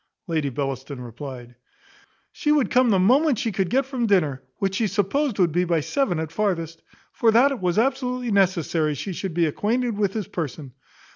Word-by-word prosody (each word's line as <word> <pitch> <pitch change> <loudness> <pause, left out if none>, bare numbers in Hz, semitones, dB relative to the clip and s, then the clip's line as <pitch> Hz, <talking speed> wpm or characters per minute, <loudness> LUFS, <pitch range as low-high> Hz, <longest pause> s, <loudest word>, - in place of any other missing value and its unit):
Lady 155 -5 -1
Bellaston 135 0 -4
replied, 125 0 -8 0.8
"She 295 - -1
would 285 -8 +2
come 255 -1 +4
the 200 - +4
moment 255 - +4
she 225 - -1
could 190 -2 -1
get 265 +2 +2
from 255 -3 -2
dinner, 155 -10 +2 0.2
which 195 -1 -1
she 220 +2 +1
supposed 210 +6 0
would 180 -4 +3
be 175 +3 +1
by 170 -3 +1
seven 195 - 0
at 160 -1 -4
farthest; 165 -4 -2 0.3
for 230 - +2
that 240 +6 +5
it 275 - -3
was 180 -1 0
absolutely 250 0 0
necessary 170 -6 +1
she 190 +7 -5
should 180 -1 -5
be 170 -1 +3
acquainted 230 - -1
with 200 -2 0
his 210 -5 -3
person. 145 -5 -5
195 Hz, 190 wpm, -23 LUFS, 160-240 Hz, 0.8 s, that